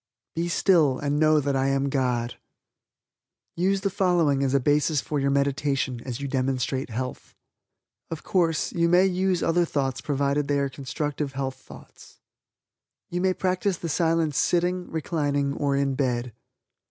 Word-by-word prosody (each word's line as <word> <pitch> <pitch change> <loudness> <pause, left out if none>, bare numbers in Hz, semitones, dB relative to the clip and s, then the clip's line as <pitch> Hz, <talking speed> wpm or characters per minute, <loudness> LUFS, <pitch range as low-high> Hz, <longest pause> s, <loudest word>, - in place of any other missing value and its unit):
"Be 170 +1 -2
still 165 -7 +3
and 145 0 -1
know 155 0 +4
that 140 -1 -1
I 135 0 +1
am 135 0 +1
God." 125 -3 -1 1.2
USE 190 +3 +1
THE 200 -1 -1
FOLLOWING 175 -8 +2
AS 135 0 +1
A - - +5
BASIS 150 +2 +2
FOR 145 +2 -2
YOUR 140 0 +1
MEDITATION 140 -2 0
AS 125 -1 -5
YOU 140 - -4
DEMONSTRATE 130 0 -1
HEALTH. 125 +3 -6 0.7
OF 165 -2 -6
COURSE, 165 -4 +1
YOU 170 -1 +2
MAY 180 +2 +5
USE 185 -1 +1
OTHER 175 +1 +2
THOUGHTS 135 -5 -2
PROVIDED 140 0 0
THEY 145 0 +1
ARE 140 -1 0
CONSTRUCTIVE 145 +1 -4
HEALTH 135 -1 -3
THOUGHTS. - - -15 0.9
You 175 +1 -1
may 185 0 +2
practice 185 0 0
the 170 - -5
Silence 160 -2 +1
sitting, 180 +3 0
reclining, 145 -3 -1
or 140 -1 0
in 140 0 +1
bed. 125 -3 -1
145 Hz, 155 wpm, -25 LUFS, 135-170 Hz, 1.2 s, A